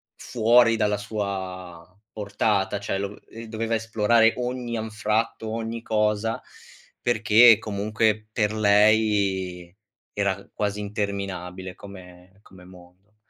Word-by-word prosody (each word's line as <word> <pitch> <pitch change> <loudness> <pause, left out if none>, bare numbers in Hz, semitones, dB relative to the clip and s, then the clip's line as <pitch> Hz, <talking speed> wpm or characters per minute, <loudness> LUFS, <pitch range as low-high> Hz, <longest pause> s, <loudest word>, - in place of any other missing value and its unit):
fuori 115 0 +3
dalla 105 -1 +1
sua 95 -4 -5 0.2
portata. 100 -1 -1
Cioè, 100 -1 -3
lo 100 0 -3
v 105 - -14
ehm, 115 - -10
doveva 115 +1 -2
esplorare 115 0 +3
ogni 125 -1 -3
anfratto, 110 +1 -2
ogni 115 0 -4
cosa, 105 +2 0 0.6
perché 115 -1 +5
comunque 110 0 -1
per 105 -2 +1
lei 100 -4 +2 0.4
era 100 -1 -2
quasi 105 0 -2
interminabile 100 -3 -5
come 95 -1 -14
come 95 -3 -17
mondo. 90 +3 -18
105 Hz, 110 wpm, -24 LUFS, 95-110 Hz, 0.6 s, perché